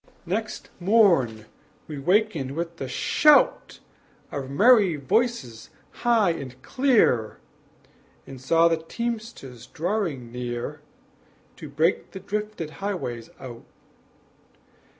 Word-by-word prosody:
Next 215 Hz, +5 st, -4 dB
morn 175 Hz, -, +3 dB, 0.4 s
we 150 Hz, -2 st, -6 dB
wakened 175 Hz, -5 st, +1 dB
with 170 Hz, +1 st, -4 dB
the 135 Hz, -, -5 dB
shout 295 Hz, -, +3 dB, 0.5 s
Of 135 Hz, -3 st, -5 dB
merry 205 Hz, -, +5 dB
voices 140 Hz, -, -1 dB, 0.2 s
high 230 Hz, -6 st, +2 dB
and 130 Hz, -6 st, -7 dB
clear; 230 Hz, -, +2 dB, 0.9 s
And 130 Hz, -2 st, -11 dB
saw 165 Hz, +5 st, +4 dB
the 165 Hz, -1 st, +1 dB
teamsters 165 Hz, -, -6 dB
drawing 165 Hz, -, -3 dB
near 120 Hz, -1 st, -5 dB, 0.8 s
To 155 Hz, -, -9 dB
break 155 Hz, +5 st, 0 dB
the 190 Hz, -, -6 dB
drifted 210 Hz, -4 st, -5 dB
highways 125 Hz, -, -4 dB
out. 120 Hz, -3 st, -10 dB
165 Hz, 100 wpm, -24 LUFS, 130-210 Hz, 0.9 s, merry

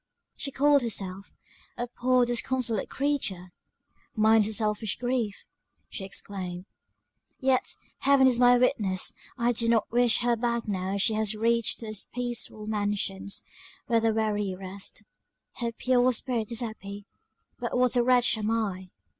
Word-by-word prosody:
She 280 Hz, -, -2 dB
called 285 Hz, +1 st, +4 dB
herself 195 Hz, -4 st, -4 dB, 0.5 s
"a 240 Hz, -, -2 dB
poor 250 Hz, +1 st, +2 dB
disconsolate 240 Hz, -2 st, 0 dB
creature!" 230 Hz, -11 st, -2 dB, 0.6 s
"Mine 220 Hz, 0 st, +5 dB
is 205 Hz, -, 0 dB
a 220 Hz, -, -2 dB
selfish 210 Hz, -1 st, 0 dB
grief," 245 Hz, -4 st, -2 dB, 0.4 s
she -, -, -5 dB
exclaimed 185 Hz, -2 st, -4 dB, 0.7 s
"Yet; 260 Hz, -1 st, +1 dB, 0.2 s
Heaven 275 Hz, -1 st, +5 dB
is 250 Hz, -2 st, +3 dB
my 245 Hz, 0 st, +6 dB
witness, 210 Hz, -7 st, +1 dB, 0.2 s
I 240 Hz, 0 st, +2 dB
do 230 Hz, 0 st, +1 dB
not 225 Hz, -3 st, +2 dB
wish 240 Hz, 0 st, +3 dB
her 240 Hz, 0 st, +2 dB
back 235 Hz, 0 st, -2 dB
now 190 Hz, -1 st, -2 dB
she 215 Hz, +3 st, +3 dB
has 215 Hz, 0 st, +1 dB
reached 230 Hz, +2 st, +1 dB
those 215 Hz, -2 st, -3 dB
peaceful 240 Hz, -3 st, -3 dB
mansions, 205 Hz, -2 st, -2 dB, 0.4 s
where 230 Hz, -3 st, +2 dB
the 225 Hz, 0 st, +2 dB
weary 210 Hz, -3 st, -1 dB
rest. 195 Hz, +3 st, -7 dB, 0.5 s
Her 235 Hz, -1 st, -2 dB
pure 250 Hz, +2 st, +2 dB
spirit 235 Hz, -2 st, -1 dB
is 235 Hz, -, +1 dB
happy; 205 Hz, -3 st, -7 dB, 0.5 s
but -, -, -2 dB
what 250 Hz, 0 st, +3 dB
a 245 Hz, -, +4 dB
wretch 245 Hz, -2 st, +3 dB
am 215 Hz, 0 st, -1 dB
I!" 200 Hz, -5 st, -2 dB
225 Hz, 145 wpm, -27 LUFS, 205-245 Hz, 0.7 s, my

